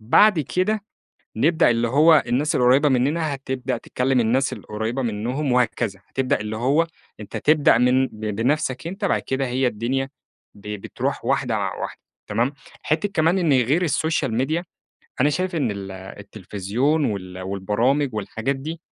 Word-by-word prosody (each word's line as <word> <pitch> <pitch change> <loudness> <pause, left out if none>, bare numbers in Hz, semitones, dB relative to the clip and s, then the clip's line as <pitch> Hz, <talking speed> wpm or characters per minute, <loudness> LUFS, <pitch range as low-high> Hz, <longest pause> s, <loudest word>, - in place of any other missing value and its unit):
بعد 170 - +5
كده 195 - -1 0.5
نبدأ 160 +4 +3
اللي 120 0 +1
هو 155 +4 +6
الناس 130 +5 +1
القريبة 130 +4 +4
مننا 145 +4 +1
هتبدأ 130 -2 -3
تكلّم 125 +2 0
الناس 130 +4 +1
القريّبة 110 +3 -4
منهم 125 +5 -2
وهكذا، 120 -5 0
هتبدأ 130 -4 0
اللي 105 +1 -4
هو 140 +8 +2 0.3
أنت 105 - -7
تبدأ 150 -5 +4
من 125 +2 +3
ب 105 - -14
بنفْسك 125 +6 -1
أنت، 195 +4 -5
بعد - - +1
كده 135 0 -1
هي 130 +1 0
الدنيا 125 +4 -1 0.5
ب - - -17 0.2
بتروح - - -3
واحدة - - +1
واحدة - - -4 0.3
تمام، 115 +6 0 0.3
حتّة 155 +6 0
كمان 165 +4 +3
إن 170 -5 +2
غير 135 +6 +3
السوشيال 155 -5 0
ميديا، 155 +8 0 0.6
أنا 145 - +4
شايف 180 +3 -2
إن 135 -8 0
ال 100 -1 -6
التليفزيون 105 - -2
وال 95 -3 -4
والبرامج 110 +9 0
والحاجات 110 +6 -2
دي، 160 +5 -6
130 Hz, 150 wpm, -22 LUFS, 110-150 Hz, 0.6 s, هو